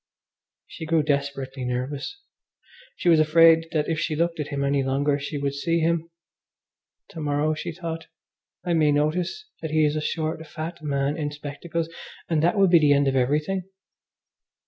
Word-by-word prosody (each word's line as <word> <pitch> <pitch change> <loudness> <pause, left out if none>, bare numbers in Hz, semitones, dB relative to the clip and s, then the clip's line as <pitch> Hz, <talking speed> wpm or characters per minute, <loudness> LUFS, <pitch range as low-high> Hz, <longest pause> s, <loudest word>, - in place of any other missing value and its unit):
She 160 - -8
grew 160 -1 +3
desperately 140 -2 -2
nervous. 130 - -3 0.8
She - - -4
was 165 -2 +6
afraid 165 +1 +6
that 150 -2 0
if 160 -1 -1
she 160 -1 -1
looked 170 +1 0
at 150 - -2
him 140 -1 -2
any 140 0 +2
longer 140 +2 +1
she 145 +1 -4
would 140 -1 -1
see 165 +4 0
him. 165 0 0 1.0
To - - -9
morrow, 150 +1 +1
she 170 +3 -4
thought, 165 -1 -6 0.6
I 175 - +1
may 155 -3 +4
notice 170 - 0 0.2
that 160 - -3
he 155 0 +3
is 150 0 +1
a 155 - -1
short, 160 +1 -2
fat 165 +2 -6
man 140 0 -1
in 150 -2 -2
spectacles, 150 +3 -4 0.4
and 160 -3 +1
that 175 +6 +2
will 195 -1 +5
be 170 -2 +6
the 150 -2 +5
end 140 0 +3
of 135 - +1
everything. 150 +9 0
155 Hz, 175 wpm, -25 LUFS, 145-165 Hz, 1.0 s, was